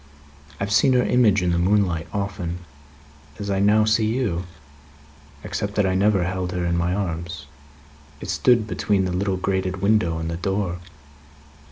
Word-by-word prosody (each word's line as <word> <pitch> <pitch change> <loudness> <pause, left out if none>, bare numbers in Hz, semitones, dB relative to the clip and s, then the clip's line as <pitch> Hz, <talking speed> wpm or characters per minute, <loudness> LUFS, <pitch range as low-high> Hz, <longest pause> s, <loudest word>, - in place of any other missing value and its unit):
I - - -2
have 100 - -3
seen 110 +5 +4
her 125 -1 +3
image 105 -6 +3
in 90 - +1
the 85 - +1
moonlight 90 -3 +1
often, 95 -4 -4 0.7
as 100 -1 -4
I 95 - 0
now 105 +2 +4
see 110 0 +2
you; 110 -7 -1 1.0
except 100 0 -4
that 105 - +2
I 95 - +1
never 100 0 +2
held 90 0 -3
her 90 -1 -2
in 85 0 0
my 85 +1 0
arms; 85 -5 -4 0.7
it - - -4
stood 120 -3 +3
between 100 -3 0
the 90 - -2
little 95 +1 -1
grated 95 0 -2
window 100 -6 +2
and 80 0 -4
the 85 - -3
door. 95 -1 -2
95 Hz, 170 wpm, -23 LUFS, 90-105 Hz, 1.0 s, seen